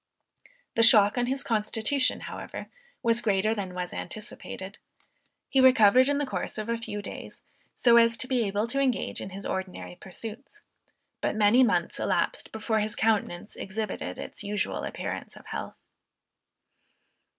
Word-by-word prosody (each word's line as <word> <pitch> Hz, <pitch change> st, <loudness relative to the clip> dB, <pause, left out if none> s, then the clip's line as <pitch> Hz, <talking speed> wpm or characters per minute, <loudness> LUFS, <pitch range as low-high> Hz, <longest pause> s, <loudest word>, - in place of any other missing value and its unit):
The 230 Hz, -, +2 dB
shock 210 Hz, -3 st, +7 dB
on 245 Hz, -1 st, 0 dB
his 270 Hz, +2 st, -1 dB
constitution, 225 Hz, +4 st, +1 dB
however, -, -, -7 dB, 0.3 s
was 230 Hz, 0 st, +3 dB
greater 210 Hz, 0 st, +2 dB
than 190 Hz, -4 st, -5 dB
was 180 Hz, -1 st, -4 dB
anticipated. 200 Hz, -1 st, -7 dB, 0.7 s
He 265 Hz, -, +3 dB
recovered 255 Hz, 0 st, +6 dB
in 285 Hz, -, +2 dB
the 290 Hz, -, 0 dB
course 260 Hz, -, -3 dB
of 215 Hz, +1 st, -4 dB
a 235 Hz, -, +1 dB
few 205 Hz, -2 st, -5 dB
days, -, -, -8 dB, 0.3 s
so 235 Hz, -1 st, +5 dB
as 230 Hz, 0 st, +5 dB
to 255 Hz, -, -1 dB
be 255 Hz, -3 st, +1 dB
able 205 Hz, +2 st, 0 dB
to 260 Hz, +4 st, -2 dB
engage 260 Hz, -3 st, 0 dB
in -, -, -5 dB
his 195 Hz, +1 st, -8 dB
ordinary 190 Hz, -1 st, -4 dB
pursuits; 230 Hz, -, -9 dB, 0.6 s
but -, -, 0 dB
many 215 Hz, +4 st, +5 dB
months 245 Hz, -, +1 dB
elapsed -, -, 0 dB
before 220 Hz, 0 st, -1 dB
his 210 Hz, 0 st, -1 dB
countenance 210 Hz, -4 st, 0 dB
exhibited 190 Hz, -, -4 dB
its -, -, -7 dB
usual 205 Hz, +1 st, -2 dB
appearance -, -, -5 dB
of -, -, -14 dB
health. -, -, -6 dB
220 Hz, 150 wpm, -27 LUFS, 205-245 Hz, 0.7 s, shock